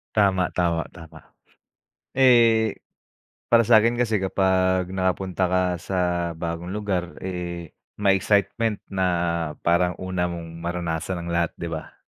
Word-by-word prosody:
Tama, 95 -4 +2
tama, 85 -2 0
tama. 80 -3 -14 0.8
Eh, 115 -4 +4 0.7
para 115 0 +5
sa'kin 115 +1 +5
kasi 115 -3 +1
kapag 95 -1 +1
nakapunta 95 0 -1
ka 90 +1 +1 0.2
sa 90 +3 -3 0.4
bagong 85 +3 -5
lugar, 95 -4 -2
eh, 85 -3 -5 0.2
may 100 -2 +2
excitement 100 +2 0
na 95 -1 0 0.6
parang 90 +1 +2
una 95 -1 -1
mong 85 -1 -7
maranasan 85 +1 -3
ang 85 - -6
lahat, 85 -1 0
'di 85 - -6
ba? 80 -1 -6
95 Hz, 125 wpm, -24 LUFS, 85-100 Hz, 0.8 s, para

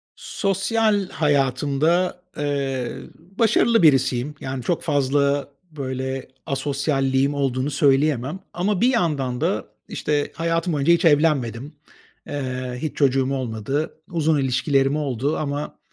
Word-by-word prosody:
Sosyal 205 0 0
hayatımda, 145 +5 +1 0.2
eee, 140 -4 -2 0.4
başarılı 230 -1 +4
birisiyim. 135 -1 +3
Yani, 130 -1 -4
çok 170 +6 -1
fazla, 140 -1 +1 0.2
böyle, 130 -2 -4 0.2
asosyalliğim 135 0 0
olduğunu 135 0 -1
söyleyemem 140 +2 +2
ama 185 +3 0
bir 240 - +5
yandan 140 - 0
da, - - 0 0.2
işte, 145 -1 -1
hayatım 165 +1 0
boyunca 150 +3 +3
hiç 170 - +2
evlenmedim. 145 -4 +2 0.5
Eee, 130 -3 -4
hiç 155 - -4
çocuğum 135 -1 +2
olmadı. 130 +5 -3
Uzun 160 -3 +1
ilişkilerim 135 +1 +1
oldu 140 -1 -1
ama 145 0 -4
140 Hz, 110 wpm, -22 LUFS, 130-160 Hz, 0.5 s, bir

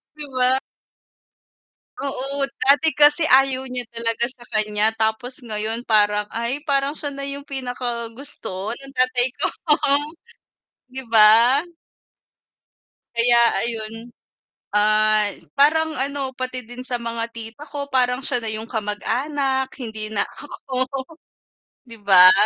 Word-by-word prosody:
Di 300 - -7
ba? 255 0 +3 1.5
Oo, 275 0 -3 0.2
dati 290 +4 +4
kasi 295 +2 +5
ayaw 265 -2 +4
niya 245 -2 -4
talaga 230 0 -1
sa 250 -2 -9
kanya, 215 0 +2
tapos 235 +5 -1
ngayon 225 0 -4
parang, 210 -1 +3
ay, 235 +6 -3
parang 275 0 +1
siya 300 -1 -3
na 275 - -6
yung 280 0 -6
pinakagusto 240 -5 -4
ng 275 +1 -12
tatay 255 -1 +2
ko. - - +2 1.4
Di 265 0 -6
ba? 230 +6 +6 1.5
Kaya 235 +1 +4 0.3
ayun, 225 -2 -4 0.8
ah, 215 0 +4 0.3
parang 315 +2 +3
ano, 275 -1 -3
pati 255 -1 -4
din 245 +1 -9
sa 250 -1 -2
mga 230 0 -3
tita 225 +4 -9
ko, 285 -1 -5
parang 250 -1 +2
siya 250 - +2
na 225 - -2
yung 220 +1 -6
kamag-anak, 265 +5 -2
hindi 220 -3 -6
na 200 -2 +1
ako. 270 +1 -5 0.7
Di 230 -1 -12
ba? 185 -2 +8
245 Hz, 120 wpm, -21 LUFS, 220-275 Hz, 1.5 s, ba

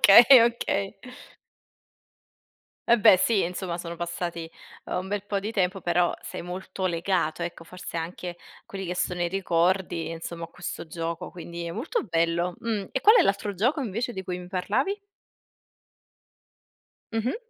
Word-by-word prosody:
Okay, 215 +5 +10 0.2
okay. 230 -4 0 1.9
Va 235 - +7
beh 195 - +8
sì, 210 0 +3
insomma 175 0 -3
sono 170 0 -6
passati, 170 -1 -4 0.4
uhm, - - -5
un 185 - -4
bel 205 0 -2
po' 200 -1 -1
di 210 - -3
tempo, 195 -3 0
però 175 0 +2
sei - - -6
molto 185 +1 -4
legato, 170 -1 0
ecco 170 -1 -5
forse 180 0 -8
anche 175 +1 -5 0.3
quelli 195 -1 -6
che 180 - -2
sono 180 -1 -1
i 175 - +2
ricordi, 175 -2 +1
insomma, 165 +1 -6
a - - -6
questo 175 0 -7
gioco, 165 +2 -4
quindi 170 -1 -7
è 170 - -4
molto 270 - -2
bello. 170 0 +1
Mh. 220 -4 -1
E 265 - 0
qual 430 - +7
è - - +7
l'altro 200 +1 0
gioco 250 - +1
invece 240 0 -2
di 190 - -5
cui 180 -1 -4
mi 180 - -9
parlavi? 205 - 0 2.2
Mh-mh. 225 - 0
180 Hz, 160 wpm, -26 LUFS, 170-200 Hz, 2.2 s, Okay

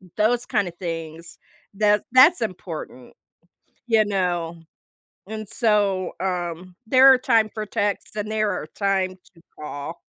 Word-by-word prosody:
those 235 +3 +1
kinda 205 -7 0
things 165 -1 -6 0.4
that 210 0 +2
that's 270 +6 +6
important, 165 - -6 0.7
you 220 -2 +4
know? 175 -4 -2 0.7
And 215 -1 -6
so, 205 -5 +1
um, 180 -1 -4
there 265 +2 +7
are - - +4
time 225 -4 +2
for 215 -1 -4
texts 205 0 -2
and 210 0 -4
there 215 -1 0
are 180 - -4
time 190 0 -1 0.2
to 165 - -20 0.2
call. 150 +2 -7
200 Hz, 130 wpm, -23 LUFS, 175-215 Hz, 0.7 s, there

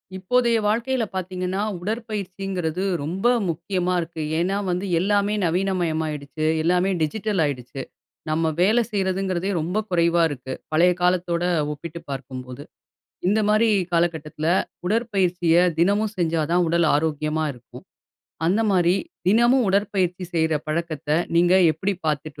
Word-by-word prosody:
இப்போதைய 235 +5 +2
வாழ்க்கையில 235 +4 +1
பார்த்தீங்கன்னா, 185 +1 -3 0.2
உடற்பயிற்சிங்கிறது 195 -4 -3 0.2
ரொம்ப 180 +9 -4 0.2
முக்கியமா 180 +2 -1
இருக்கு. 165 -1 -6 0.2
ஏன்னா 185 +4 0
வந்து, 180 +2 -1
எல்லாமே 205 +2 +1
நவீனமயமாயிடுச்சு, 160 -4 -1 0.2
எல்லாமே 180 +3 +2
டிஜிட்டல் 200 +4 0
ஆயிடுச்சு. 135 -1 -5 0.5
நம்ம 160 +1 +1
வேலை 220 +6 +4
செய்யறதுங்கிறதே 190 -2 -1
ரொம்ப 180 +6 -2
குறைவா 170 -1 +3
இருக்கு, 130 -2 -6 0.2
பழைய 175 +3 +4
காலத்தோட 180 -1 +1 0.3
ஒப்பிட்டு 170 +3 -8
பார்க்கும்போது. 130 -1 -7 0.6
இந்த 210 +4 +3
மாரி 220 +2 +4 0.2
காலக்கட்டத்தில, 160 -2 -1 0.4
உடற்பயிற்சிய 185 -6 +1 0.2
தினமும் 205 +5 +2
செஞ்சா 165 -3 0
தான் 175 0 +3
உடல் 170 0 +2
ஆரோக்கியமா 155 +1 0
இருக்கும். 125 -2 -14 0.6
அந்த 195 +6 +2
மாரி 180 -1 +3 0.3
தினமும் 235 +5 +4
உடற்பயிற்சி 190 -2 0
செய்ற 160 -1 +2
பழக்கத்த 155 -2 -3 0.3
நீங்க 175 +2 +5 0.2
எப்படி 185 +6 -2
பார்த்துட்டு 150 -1 -2
180 Hz, 115 wpm, -23 LUFS, 160-195 Hz, 0.6 s, நீங்க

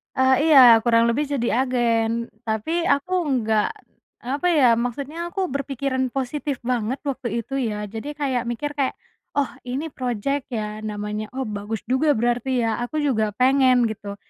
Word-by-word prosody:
Eee, 260 0 +4
iya 250 -7 +8
kurang 230 -1 +4
lebih 290 +6 0
jadi 265 -5 -1 0.2
agen 235 -2 0 0.2
tapi 320 +11 -1
aku 285 +6 +1 0.3
nggak, 215 -1 +2 0.6
apa 280 +8 -1
ya 305 -7 +4
maksudnya 280 +8 -4
aku 375 +1 -2
berpikiran 275 -1 -2
positif 275 +1 -2
banget 245 +1 -1
waktu 265 -3 -3 0.2
itu 270 - -10
ya 210 -4 -2
jadi 225 +6 -5
kayak 265 -5 -1
mikir 290 +5 -3
kayak, 270 -2 0 0.4
"Oh 285 -3 +1 0.2
ini 280 +5 -3
projek 255 +3 -2
ya 215 -2 -4
namanya 210 0 -4
oh 265 - -1
bagus 210 +1 -4
juga 290 +2 +3
berarti 240 +1 0
ya 225 0 0
aku 310 +6 -4
juga 225 -6 +1
pengen." 255 -1 +4
gitu, 200 -1 -6
255 Hz, 155 wpm, -23 LUFS, 225-280 Hz, 0.6 s, iya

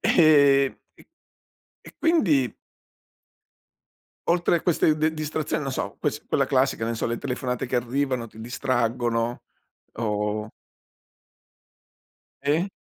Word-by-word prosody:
ehm, 140 -4 +5 1.0
e - - -14
quindi 165 - +2 1.7
Oltre 175 0 +3
a - - -8
queste 155 -3 +2
de 155 +1 +1
distrazioni, 155 0 -2
no 135 - -3
so, 100 -6 -4
ques 145 -1 -1
quella 140 - +2
classica, 130 -4 +1
non 115 - -2
so, - - -2
le 115 0 -2
telefonate 125 -1 -3
che 125 - -2
arrivano, 125 0 -1
ti 110 - -15
distraggono? 120 -1 -1 0.5
O 105 -1 -2 2.0
E? 160 +7 +1
130 Hz, 110 wpm, -25 LUFS, 115-155 Hz, 2.0 s, ehm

